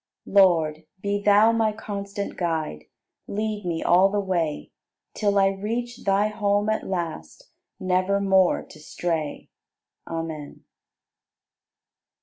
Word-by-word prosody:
80. - - -11
Lord, 165 -5 +4
be 200 +1 -1
Thou 210 +2 +5
my 225 -1 +2
constant 200 -1 -5
Guide, 160 - -2 0.4
Lead 210 -1 -3
me 165 -2 -2
all 185 +3 +5
the 205 +1 0
way, 175 -6 -2 0.4
Till 205 -2 +1
I 195 0 +5
reach 230 +5 -4
Thy 200 +1 +3
home 205 0 0
at 220 - -1
last, 170 - -5 0.3
Nevermore 190 0 +2
to 155 - -14
stray. 160 0 -4 0.6
Amen. 160 -3 -6
195 Hz, 115 wpm, -24 LUFS, 170-205 Hz, 0.6 s, Thou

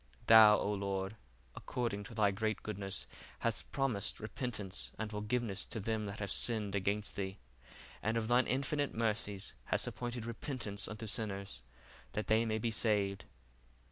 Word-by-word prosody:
Thou, 110 -1 +9
O 105 - 0
Lord, 100 0 -2 0.4
according 110 -5 -3
to 115 - -9
thy 105 -2 +4
great 110 +1 -1
goodness 95 -10 -4 0.3
hast - - -2
promised 125 -8 0
repentance 110 -4 -3
and 110 -1 -3
forgiveness 105 0 -1
to 115 - -3
them 110 0 -1
that 100 +1 -5
have 100 -2 -3
sinned 110 -4 +3
against 100 +1 -1
thee: 95 -1 -3 0.6
and 110 +2 0
of 110 -1 -1
thine 120 +2 +4
infinite 140 +2 0
mercies 105 -3 -1
hast - - +2
appointed 120 -1 -4
repentance 115 -3 -4
unto 110 +1 -6
sinners, 100 -3 0 0.5
that 105 - -1
they 110 +1 +3
may 110 0 +1
be 115 +1 -1
saved. 100 -3 +1
105 Hz, 150 wpm, -35 LUFS, 100-115 Hz, 0.6 s, Thou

